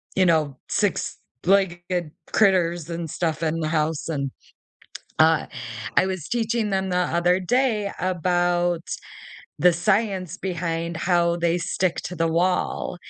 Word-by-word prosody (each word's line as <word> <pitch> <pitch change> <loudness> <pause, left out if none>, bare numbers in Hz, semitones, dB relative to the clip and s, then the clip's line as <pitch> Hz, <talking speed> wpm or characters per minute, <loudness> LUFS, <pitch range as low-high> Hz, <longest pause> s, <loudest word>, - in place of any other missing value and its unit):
you 190 - +4
know, 155 -6 +2
six-legged 180 - 0 0.2
critters 175 -5 +2
and 170 -1 -4
stuff 160 +1 -2
in 160 +1 0
the 155 - -1
house, 155 -1 0
and 140 -4 -2 0.9
uh, 160 -1 +5 0.5
I - - +5
was 185 -5 -4
teaching 230 -2 0
them 190 0 0
the 180 - 0
other 175 0 +2
day 215 0 +1
about 175 -1 +1 0.8
the 175 +4 +5
science 190 -1 0
behind 170 -2 -3
how 170 0 +2
they 170 0 +1
stick 175 +1 -1
to 180 - -5
the 165 0 +1
wall 180 +2 0
175 Hz, 130 wpm, -24 LUFS, 165-190 Hz, 0.9 s, uh